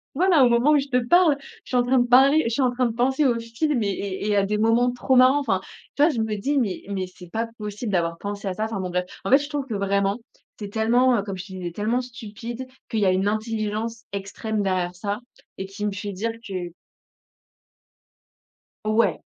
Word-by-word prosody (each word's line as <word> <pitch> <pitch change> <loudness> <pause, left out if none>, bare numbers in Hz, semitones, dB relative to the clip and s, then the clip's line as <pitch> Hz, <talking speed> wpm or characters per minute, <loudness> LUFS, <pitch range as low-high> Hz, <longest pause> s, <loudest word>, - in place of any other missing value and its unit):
Voilà, 340 -4 +5
au 245 - +6
moment 235 +5 +3
où 300 - +5
je 275 - -1
te 250 -2 +2
parle, 335 +2 +5
je - - -16
suis 255 - +1
en 245 - +5
train 255 +1 +3
de 245 - +3
parler 275 +5 +6
je - - 0
suis 270 - +1
en 255 - +3
train 250 +1 0
de 230 - -2
penser 265 +5 +2
au 245 -3 +2
film 235 +3 -1
et 205 - 0
et 200 +1 -3
et 205 - +2
à 200 - +3
des 210 +1 -1
moments 230 +3 +3
trop 255 +2 +1
marrants 260 +3 +6
enfin, 205 -9 0 0.4
tu 285 - +2
vois, 325 - +5
je 235 - -2
me 220 -1 -1
dis: 275 +9 -1
«Mais 215 -8 -1
mais 190 -2 -2
c'est 180 -1 -14
pas 230 +3 -2
possible 210 +1 -5
d'avoir 170 -2 0
pensé 205 +1 -5
à 190 - -1
ça», 215 - -2
enfin 220 -2 -3
bon, 185 -1 -3
bref. 180 +1 0 0.2
En 195 - -2
fait, 270 - +8
je 290 0 -5
trouve 290 -2 -3
que 230 - -4
vraiment 200 +1 0 0.4
c'est 205 - -5
tellement, 240 +4 +3
heu, - - 0
comme 195 -2 -5
je 185 +1 -7
te - - -11
disais, 180 -2 -5
tellement 220 +7 0
stupide 235 +1 -7 0.2
qu'il 220 - -1
y 200 - +3
a 185 - +5
une 190 +1 +1
intelligence 215 +1 -2
extrême 205 +2 -3
derrière 185 -2 -1
ça 200 +3 -3 0.4
et 190 - -4
qui 195 +2 -6
me 210 - +1
fait 205 +1 -5
dire 210 +5 -2 0.2
que 180 -3 -5 2.1
Ouais. 215 +2 +2
220 Hz, 240 wpm, -24 LUFS, 200-250 Hz, 2.1 s, fait